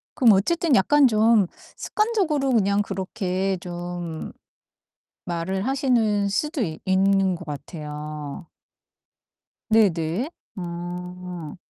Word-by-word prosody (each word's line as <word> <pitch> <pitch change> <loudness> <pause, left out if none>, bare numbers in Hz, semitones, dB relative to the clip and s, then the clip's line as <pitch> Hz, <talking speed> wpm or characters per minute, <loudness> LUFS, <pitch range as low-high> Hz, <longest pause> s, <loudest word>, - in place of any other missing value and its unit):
그럼 250 -7 +6
어쨌든 320 - +2
약간 280 +9 +5
좀 220 -3 +4 0.3
습관적으로 370 - 0
그냥 200 -3 +3
그렇게 190 -1 -2
좀 175 -2 -6 0.9
말을 185 +4 -2
하시는 235 -7 +2
수도 295 +7 -1
있 160 -6 -3
있는 190 0 +3
것 175 - -8
같아요. 150 +1 -7 1.2
네 220 -2 +6
네. 165 - -2 0.3
음. 175 -1 -6
190 Hz, 185 characters per minute, -24 LUFS, 175-225 Hz, 1.2 s, 그럼